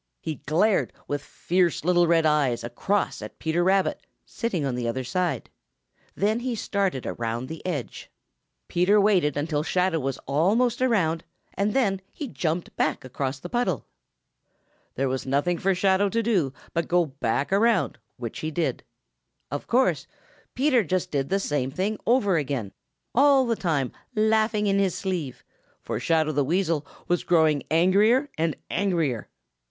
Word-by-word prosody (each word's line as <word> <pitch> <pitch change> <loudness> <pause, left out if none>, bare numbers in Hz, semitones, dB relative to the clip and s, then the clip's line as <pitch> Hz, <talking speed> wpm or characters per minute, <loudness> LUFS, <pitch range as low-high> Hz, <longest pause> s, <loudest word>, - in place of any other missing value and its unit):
He 155 -3 -4
glared 185 +8 +2
with 145 0 -2
fierce 175 0 0
little 175 -1 +4
red 165 -1 +3
eyes 140 -6 +2
across 195 - -1
at 105 0 -9
Peter 165 +2 0
Rabbit, 190 +1 +2 0.2
sitting 190 - -2
on 135 - -1
the 120 -1 -2
other 130 +3 -2
side. 180 +6 -2 0.6
Then 215 +3 +1
he 245 -1 -2
started 195 - -1
around 115 +1 -3
the 160 +2 -8
edge. 145 -9 -4 0.6
Peter 185 +4 +3
waited 185 -9 +3
until 145 0 0
Shadow 180 +1 +1
was 135 -1 -2
almost 215 - +2
around, 180 -10 +2 0.3
and 205 +4 -1
then 200 -8 +2
he 295 - -6
jumped 170 -6 -3
back 155 -4 0
across 130 +1 -3
the 175 - -7
puddle. 190 - -1 1.1
There 135 +1 0
was 130 0 -3
nothing 145 +6 +1
for 195 0 +2
Shadow 195 +2 +3
to 230 +3 0
do 190 - +1 0.2
but 170 - -1
go 175 -1 +3
back 135 +2 -2
around, 225 +3 +2 0.2
which 120 -3 -6
he 155 - -3
did. 160 +1 -1 0.7
Of - - -4
course, 255 +2 +2 0.5
Peter 260 -3 +3
just 185 +1 -1
did 140 -2 -1
the 195 - +1
same 145 -8 -1
thing 195 +9 -2
over 210 -7 +3
again, 135 -9 -2 0.4
all 275 0 +5
the 235 -1 +1
time 155 - -1 0.2
laugh 220 +1 +2
ing 210 0 +1
in 200 -1 +2
his 195 -3 +1
sleeve, 175 -9 -4 0.4
for - - -4
Shadow 160 -2 +2
the 145 -1 +1
Weasel 165 -1 0 0.2
was 175 0 +1
growing 160 -4 +3
angrier 205 - +4
and 160 0 0 0.2
angrier. 165 - 0
175 Hz, 160 wpm, -25 LUFS, 145-200 Hz, 1.1 s, all